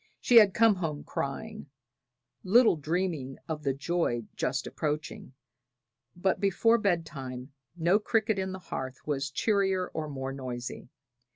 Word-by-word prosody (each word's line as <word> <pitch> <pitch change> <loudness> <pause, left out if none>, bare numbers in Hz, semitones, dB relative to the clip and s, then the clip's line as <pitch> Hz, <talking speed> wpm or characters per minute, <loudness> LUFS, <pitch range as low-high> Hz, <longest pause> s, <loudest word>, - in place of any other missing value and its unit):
She 245 - +5
had 205 -4 +7
come 225 -1 +6
home 155 -5 -3
crying, 215 +6 -5 0.7
little 225 +2 +5
dreaming 155 -4 -2
of 155 -2 -4
the 135 -3 -1
joy 140 -5 -1
just 130 +1 -1
approaching; 150 -3 -4 0.8
but 185 +2 0
before 225 +4 +3
bed 175 -6 +1
time 130 -3 -7 0.3
no 175 +5 +3
cricket 220 -1 +1
in 190 0 -2
the 190 - -5 0.2
hearth 130 0 -5
was 140 -2 -1
cheerier 190 +2 +1
or 155 -1 -4
more 135 -1 -4
noisy. 125 -2 -6
165 Hz, 135 wpm, -29 LUFS, 135-195 Hz, 0.8 s, had